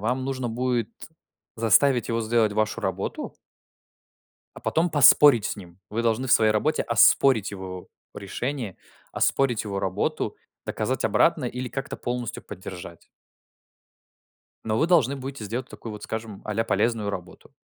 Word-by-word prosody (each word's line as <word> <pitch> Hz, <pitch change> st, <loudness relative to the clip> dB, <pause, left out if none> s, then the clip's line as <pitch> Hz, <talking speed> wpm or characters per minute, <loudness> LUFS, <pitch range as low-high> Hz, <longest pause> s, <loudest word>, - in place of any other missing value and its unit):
вам 125 Hz, +5 st, -1 dB
нужно 130 Hz, -2 st, -3 dB
будет 120 Hz, -1 st, -1 dB, 0.7 s
заставить 120 Hz, +3 st, +3 dB
его 115 Hz, 0 st, 0 dB
сделать 110 Hz, -1 st, +2 dB
вашу 110 Hz, +1 st, -1 dB
работу. -, -, -4 dB, 1.2 s
А -, -, -11 dB
потом 170 Hz, +2 st, 0 dB
поспорить 145 Hz, -5 st, +6 dB
с -, -, -2 dB
ним. 90 Hz, -3 st, -13 dB
Вы 115 Hz, +2 st, -2 dB
должны 115 Hz, +3 st, 0 dB
в -, -, 0 dB
своей 110 Hz, -1 st, +5 dB
работе 110 Hz, +9 st, +1 dB
оспорить 115 Hz, -1 st, +4 dB
его 95 Hz, -2 st, -7 dB, 0.3 s
решение, 115 Hz, +2 st, -4 dB, 0.3 s
оспорить 135 Hz, -5 st, +1 dB
его 100 Hz, -2 st, -3 dB
работу, 95 Hz, -1 st, -2 dB, 0.3 s
доказать -, -, -2 dB
обратное -, -, +2 dB
или 125 Hz, +1 st, -5 dB
как-то 135 Hz, +2 st, -5 dB
полностью 120 Hz, -2 st, -4 dB
поддержать. 90 Hz, -2 st, -9 dB, 1.6 s
Но 110 Hz, 0 st, -1 dB
вы 160 Hz, -, +2 dB
должны 145 Hz, -7 st, +3 dB
будете 135 Hz, -3 st, -7 dB
сделать 120 Hz, +6 st, -4 dB
такую 115 Hz, -, -9 dB
вот, 105 Hz, -, -9 dB
скажем, 110 Hz, -2 st, -6 dB
а-ля 110 Hz, +1 st, -1 dB
полезную 115 Hz, -2 st, 0 dB
работу. 90 Hz, -3 st, -8 dB
115 Hz, 140 wpm, -25 LUFS, 105-130 Hz, 1.6 s, поспорить